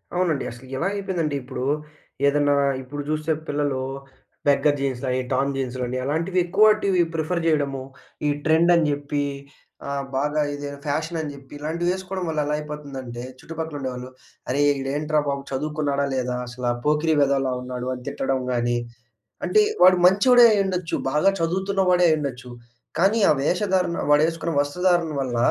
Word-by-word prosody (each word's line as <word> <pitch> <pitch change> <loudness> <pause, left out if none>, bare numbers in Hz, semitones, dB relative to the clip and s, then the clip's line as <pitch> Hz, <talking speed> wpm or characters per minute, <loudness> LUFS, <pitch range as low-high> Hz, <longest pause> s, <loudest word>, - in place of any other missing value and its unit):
అవునండి. 170 -6 +1
అసలు 125 +2 -12
ఎలా 190 - 0
అయిపోయిందంటే 180 -7 -2
ఇప్పుడూ? 130 0 -5 0.6
ఏదన్నా 145 0 +3 0.3
ఇప్పుడు 145 +3 -6
చూస్తే 155 +1 -1 0.2
పిల్లలు 145 -2 -1 0.7
బెగ్గర్ 145 +1 +3
జీన్స్‌లయి, 130 -1 -1
టోర్న్ 140 +1 +1
జీన్స్‌లని, 130 -1 -3
అలాంటివి 165 +6 0
ఎక్కువాటివి 200 -1 +4
ప్రిఫర్ 165 +2 -1
చేయడము. 140 -4 +1 0.5
ఈ - - +3
ట్రెండ్ 160 +2 +4
అని 165 -2 +3
చెప్పి, 145 0 -2 0.6
ఆహ్, 140 0 -2
బాగా 150 +2 +1
ఇది 145 0 -5 0.2
ఫ్యాషనని 155 +1 -2
చెప్పి, 135 0 -15
ఇలాంటివి 170 +4 -1
ఏసుకోవడం 185 -1 -5
వల్ల 155 -1 -1
ఎలా 150 - -1
అయిపోతుందంటే, 140 -5 -7 0.2
చుట్టుపక్కల 160 -2 -6
ఉండేవాళ్ళు, 125 -1 -5 0.4
అరే! 140 +3 +1 0.2
ఈడు 135 0 -3
ఏంట్రా 150 0 +1
బాబు, 140 0 -2
చదువుకున్నాడా 145 0 -1
లేదా 125 -1 -1
అసల 120 0 -2
పోకిరి 150 +1 +2
వెదవలా 135 -2 +2
ఉన్నాడు, 125 0 -5
అని 125 - -8
తిట్టడం 135 -1 -1
గాని. 120 0 +1 0.7
అంటే 425 - +4 0.2
వాడు 185 0 +8
మంచోడే 240 +6 +7
అయ్యుండొచ్చు. 190 -4 0 0.2
బాగా 150 +7 +3
చదువుతున్నవాడే 180 +1 +2
అయ్యుండొచ్చు. 135 -5 -2 0.5
కానీ, 200 +5 +4
ఆ - - +7
వేషధారణ, 180 +1 +1 0.2
వాడేసుకున్న 165 +2 +2
వస్త్రధారణ 170 +2 +1
వల్ల, 125 -2 -3
150 Hz, 140 wpm, -23 LUFS, 135-170 Hz, 0.7 s, వాడు